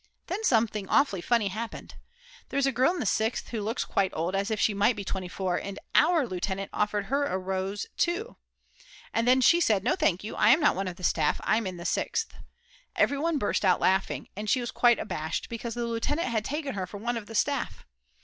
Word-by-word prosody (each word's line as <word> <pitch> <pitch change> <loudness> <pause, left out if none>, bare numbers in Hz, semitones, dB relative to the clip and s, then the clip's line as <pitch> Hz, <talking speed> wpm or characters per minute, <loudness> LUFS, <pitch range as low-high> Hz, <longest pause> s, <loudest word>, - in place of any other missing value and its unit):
Then 395 +5 -4
something 220 - +1
awfully 240 -11 +3
funny 225 +1 +1
happened. 220 +4 -6 0.6
There - - -3
is 280 - +3
a 270 - +2
girl 260 +6 +3
in 365 - -4
the - - -2
Sixth 220 +4 0
who 225 -3 -3
looks 220 +4 -2
quite 195 -1 +1
old, 170 +4 -1
as 195 +2 0
if 220 -1 -1
she 215 - +2
might 205 +4 +3
be 205 - -5
24, 185 -1 -2
and 200 0 -5 0.2
"our" 335 -5 +4
lieutenant 195 -1 -3
offered 210 -1 0
her 280 +5 0
a 190 - -1
rose 190 +2 -3
too. 365 +7 -1 0.8
And 230 +1 +1
then 255 +1 +5
she 340 +7 +5
said: 210 - +2
"No 240 - +2
thank 190 - +1
you, 215 - -6
I 210 - +4
am 270 +7 +7
not 295 - +3
one 195 +1 -2
of 180 - -5
the 180 - -13
staff, - - +1
I'm 220 -2 +1
in 185 -1 -5
the 170 - -8
Sixth." 450 - -1 0.6
Everyone 300 +3 +1
burst 210 -5 0
out 185 -2 +4
laughing, 190 +1 +1
and 210 +1 -4
she 255 - +3
was 240 -1 -4
quite 240 -1 +4
abashed 160 -5 -4
because 230 0 -5
the 240 0 -2
lieutenant 255 +6 -1
had 220 -2 0
taken 290 +3 -3
her 190 -3 -3
for 205 - -8
one 240 +4 -2
of 225 -3 -5
the 225 - -8
staff. 280 +3 -1
220 Hz, 225 wpm, -28 LUFS, 195-260 Hz, 0.8 s, am